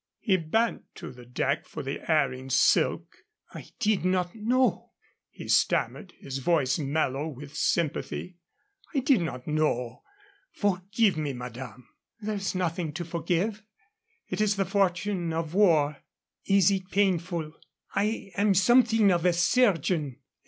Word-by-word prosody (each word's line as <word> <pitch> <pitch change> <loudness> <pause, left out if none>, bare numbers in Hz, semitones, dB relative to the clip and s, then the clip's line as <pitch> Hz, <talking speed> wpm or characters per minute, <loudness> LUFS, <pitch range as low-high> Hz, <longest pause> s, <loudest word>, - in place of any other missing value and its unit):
He 195 -5 +1
bent 200 +7 0
to - - -8
the 125 -1 -14
deck 135 +3 -1
for - - -7
the 135 +1 -4
erring 135 -4 +1
silk. 130 - +2 0.4
"I - - -9
did 215 -5 +1
not 180 -1 0
know," 245 +4 0 0.4
he - - -10
stammered, 190 - +1
his 135 -1 -6
voice 140 -1 +1
mellow 145 0 -1
with 145 -1 -9
sympathy. 170 +2 -2 0.6
"I 275 - +2
did 260 -6 +3
not 130 -6 -5
know. 140 -6 -1 0.5
Forgive 195 0 +1
me, 150 -3 -2
madame." 125 0 -8 0.3
"There 215 0 -3
is 195 -2 -3
nothing 170 -3 -2
to 175 +3 -5
forgive. 175 +6 -1 0.7
It - - -3
is 210 -1 +2
the 195 -1 0
fortune 190 -2 0
of 160 0 -3
war." 160 -7 +3 0.5
"Is 195 -1 +4
it 190 -1 -2
painful? 175 -5 0 0.4
I 205 0 -1
am 200 -1 +2
something 225 +1 +4
of 170 -2 +1
a 180 -1 +3
chirurgeon. 170 - +2
175 Hz, 140 wpm, -27 LUFS, 150-200 Hz, 0.7 s, Is